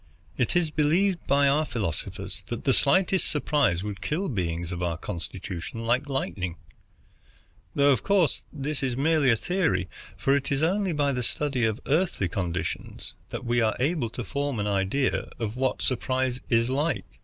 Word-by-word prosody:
"It 125 Hz, +6 st, 0 dB
is 170 Hz, -3 st, +2 dB
believed 170 Hz, +5 st, +2 dB
by 140 Hz, 0 st, +4 dB
our 145 Hz, +3 st, +3 dB
philosophers 105 Hz, -, -4 dB
that -, -, -4 dB
the -, -, +3 dB
slightest 185 Hz, +5 st, +3 dB
surprise 145 Hz, -, +1 dB
would 105 Hz, -1 st, -5 dB
kill 180 Hz, +5 st, -1 dB
beings 85 Hz, -5 st, -2 dB
of 90 Hz, 0 st, -4 dB
our 85 Hz, -2 st, -1 dB
constitution 95 Hz, +3 st, -6 dB
like 125 Hz, +5 st, +1 dB
lightning; 90 Hz, -10 st, -2 dB, 1.2 s
though 140 Hz, 0 st, +5 dB
of 130 Hz, -, +2 dB
course 195 Hz, -6 st, +2 dB
this 145 Hz, 0 st, -3 dB
is 130 Hz, -3 st, -1 dB
merely 145 Hz, -4 st, +4 dB
theory, 110 Hz, -, 0 dB, 0.3 s
for 135 Hz, +8 st, +3 dB
it 140 Hz, 0 st, -1 dB
is 140 Hz, +2 st, +1 dB
only 190 Hz, +3 st, +2 dB
by 145 Hz, -3 st, +1 dB
the 125 Hz, -, -1 dB
study 135 Hz, -1 st, 0 dB
of 110 Hz, +1 st, 0 dB
Earthly 150 Hz, -, +1 dB
conditions 90 Hz, -1 st, -4 dB, 0.2 s
that -, -, -5 dB
we 120 Hz, 0 st, +2 dB
are 110 Hz, -1 st, +2 dB
able 135 Hz, -2 st, +1 dB
to 120 Hz, -, -5 dB
form 140 Hz, 0 st, -2 dB
an 105 Hz, -, 0 dB
idea 100 Hz, +7 st, 0 dB
of 110 Hz, -1 st, -3 dB
what 130 Hz, +1 st, 0 dB
surprise 130 Hz, 0 st, 0 dB
is 115 Hz, -1 st, +3 dB
like. 145 Hz, +5 st, 0 dB
130 Hz, 165 wpm, -27 LUFS, 105-150 Hz, 1.2 s, though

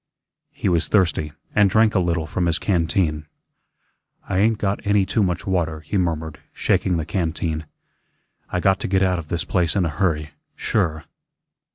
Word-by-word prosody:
He -, -, -4 dB
was 85 Hz, -3 st, +2 dB
thirsty, 85 Hz, -6 st, +1 dB, 0.2 s
and 105 Hz, -1 st, +4 dB
drank 110 Hz, +2 st, +4 dB
a 95 Hz, -, +3 dB
little 85 Hz, -3 st, 0 dB
from 85 Hz, +3 st, -1 dB
his 85 Hz, 0 st, +3 dB
canteen. 85 Hz, -4 st, 0 dB, 1.0 s
"I 95 Hz, -, 0 dB
ain't 110 Hz, +2 st, +3 dB
got 100 Hz, -1 st, -1 dB
any 100 Hz, -1 st, +3 dB
too 110 Hz, -, 0 dB
much 90 Hz, -4 st, -1 dB
water," 85 Hz, -5 st, -1 dB
he 75 Hz, -, -5 dB
murmured, 80 Hz, -4 st, -1 dB
shaking 90 Hz, -2 st, +1 dB
the 80 Hz, -, -2 dB
canteen. 80 Hz, -3 st, -2 dB, 0.8 s
"I 90 Hz, -, -1 dB
got 95 Hz, +1 st, +3 dB
to -, -, -3 dB
get 95 Hz, 0 st, +2 dB
out 90 Hz, -2 st, +1 dB
of 80 Hz, -, -8 dB
this 85 Hz, +2 st, -2 dB
place 90 Hz, -1 st, 0 dB
in 95 Hz, -3 st, +2 dB
a -, -, 0 dB
hurry, 75 Hz, -2 st, -1 dB, 0.2 s
sure." 80 Hz, -1 st, -1 dB
85 Hz, 175 wpm, -22 LUFS, 80-95 Hz, 1.0 s, and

